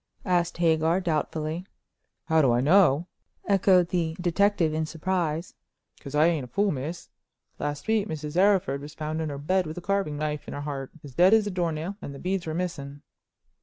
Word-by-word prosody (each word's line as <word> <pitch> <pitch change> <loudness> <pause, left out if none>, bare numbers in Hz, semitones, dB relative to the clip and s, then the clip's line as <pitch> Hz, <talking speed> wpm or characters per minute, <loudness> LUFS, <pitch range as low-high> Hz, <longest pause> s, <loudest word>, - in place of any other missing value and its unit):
asked 175 -4 +1
Hagar, 165 +1 +2
doubtfully. 160 -1 -2 0.6
"How 160 -1 +3
do 135 -4 +4
I 120 - +3
know?" 160 +1 +4 0.4
echoed 185 -3 +4
the 165 -3 -1
detective 175 -1 +2
in 155 0 -1
surprise. 170 0 -2 0.5
"'Cause 140 0 -8
I 150 +2 +5
ain't 165 -5 +1
a - - -12
fool, 200 - +1
miss. 150 +5 -5 0.5
Last 145 +4 -4
week 220 -2 +2
Mrs. 150 -2 -5
Arryford 185 -8 +3
was 145 +2 -10
found 155 +1 -3
in 155 - -2
her 140 - -5
bed 180 +5 0
with 155 - -7
a - - -4
carving 195 -6 -1
knife 150 0 -3
in - - -6
her 145 - -4
heart, 140 -2 -5
as 140 -3 -10
dead 185 - +6
as 220 -2 +3
a 205 - -2
door 175 -2 0
nail, 165 +6 -5
and 140 - -7
the - - -9
beads 185 -1 -2
were 160 - -3
missing. 145 -6 -4
160 Hz, 200 wpm, -26 LUFS, 150-180 Hz, 0.6 s, dead